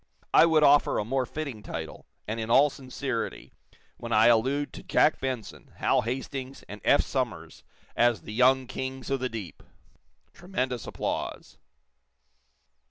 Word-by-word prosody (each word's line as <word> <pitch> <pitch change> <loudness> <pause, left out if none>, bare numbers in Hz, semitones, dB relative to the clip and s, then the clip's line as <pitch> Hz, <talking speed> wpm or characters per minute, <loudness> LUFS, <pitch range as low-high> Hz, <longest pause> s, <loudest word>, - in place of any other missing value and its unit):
I 165 - +7
would 160 -2 +4
offer 145 0 +5
a 105 - -1
more 130 +2 -1
fitting 140 -7 -5
title 80 -5 -7 0.2
and 110 +2 -3
in 110 0 -4
all 140 +4 +5
sincerity 130 -2 -5 0.4
when 115 - -7
I 110 +1 +6
allude 135 +5 +1
to - - -8
Jack 155 - +2
Benson, 130 -5 -5
Hal - - +2
Hastings 130 +2 -5
and 105 0 -9
Eph - - +4
Somers - - -4 0.3
as 120 -6 +2
the 105 - -8
Young 130 +3 +4
Kings 130 +1 -5
of 135 - +1
the 130 0 -2
Deep!" 110 -7 -7 0.7
(Tremendous 130 - -3
applause.) - - -4
130 Hz, 145 wpm, -27 LUFS, 115-135 Hz, 0.7 s, I